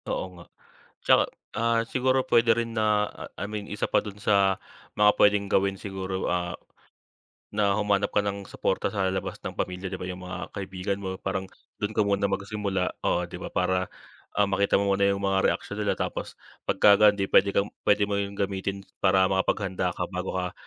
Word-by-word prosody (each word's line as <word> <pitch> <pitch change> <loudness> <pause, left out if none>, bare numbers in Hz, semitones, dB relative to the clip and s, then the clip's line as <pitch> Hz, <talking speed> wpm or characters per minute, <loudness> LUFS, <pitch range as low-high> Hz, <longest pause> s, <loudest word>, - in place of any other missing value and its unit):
Oo - - -1
nga. 85 - -12 0.6
'Tsaka, - - +6 0.3
ah, 115 +1 +2
siguro 130 +2 +1
puwede 115 -1 +4
rin 115 -1 -2
na 105 -1 +2
ah, - - -9
I - - -3
mean 105 -1 -5
isa 105 0 -2
pa - - +3
dun 105 -1 -8
sa 100 -2 +3 0.4
mga 105 0 +6
puwedeng 105 0 +4
gawin 95 0 +2
siguro, 95 -1 -4
ah, 90 -1 -1 1.0
na 100 -1 +2
humanap 100 -1 +1
ka - - +4
ng 100 0 -3
suporta 95 - -1
sa 100 -3 0
labas 95 - -3
ng - - -3
pamilya, 90 +1 -3
'di - - -4
ba, - - -3
'yung 90 0 -6
mga 90 0 -6
kaibigan 95 0 -3
mo, 95 -1 -4
parang 95 0 -2 0.3
dun 105 +1 -2
ka - - +3
muna 100 0 +1
magsimula, 100 -1 -1 0.2
oo 90 - +2
'di - - -7
ba - - -5
para, 95 0 +1 0.5
ah, 105 - +4
makita 100 +1 +2
mo 100 - 0
muna 100 0 +2
'yung 100 0 0
mga 95 -1 +2
reaksyon - - -7
nila - - +1
tapos - - -3 0.3
pagka 100 -1 +6
ganun 105 -1 +5
'di 95 - -1
puwede 100 - +5
kang 100 +1 +2 0.2
puwede 105 0 +4
mo 100 - 0
'yung 100 0 -3
gamitin 100 0 -2 0.2
para 95 -1 +4
makapaghanda 95 -1 0
ka 90 - -2
bago 90 0 -3
ka 90 -1 -2
100 Hz, 195 wpm, -26 LUFS, 95-105 Hz, 1.0 s, Tsaka